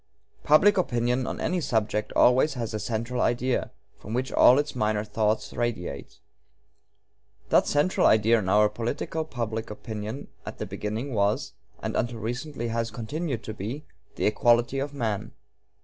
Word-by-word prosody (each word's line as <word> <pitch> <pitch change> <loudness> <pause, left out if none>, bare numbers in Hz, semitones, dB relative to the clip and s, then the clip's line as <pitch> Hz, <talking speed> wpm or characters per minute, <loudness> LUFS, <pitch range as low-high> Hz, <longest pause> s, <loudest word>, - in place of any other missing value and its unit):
Public 190 +7 +5
opinion 125 -4 0
on - - -4
any 180 -1 0
subject 110 -6 -1
always 130 +4 +4
has 115 -2 -4
a 110 - -2
'central 115 +4 -2
idea,' 125 +1 0 0.3
from 110 - -6
which 130 +2 -1
all 125 - +6
its 145 -1 -1
minor 105 -3 0
thoughts 110 0 -1
radiate. 90 -12 -4 1.3
That - - +4
'central 150 +6 +3
idea' 110 +1 +4
in 95 -3 -3
our 105 +2 +5
political 120 +9 -3
public 115 -6 -4
opinion 110 +4 -6
at - - -8
the - - -4
beginning 110 +6 -4
was, 100 -1 0 0.3
and - - -2
until 120 0 -1
recently 120 +2 -4
has 115 0 -1
continued 120 +4 -4
to 110 - -5
be, 115 +9 -6 0.3
'the - - -1
equality 120 +4 +3
of 140 +1 -3
men.' 115 -8 -3
115 Hz, 150 wpm, -26 LUFS, 110-130 Hz, 1.3 s, all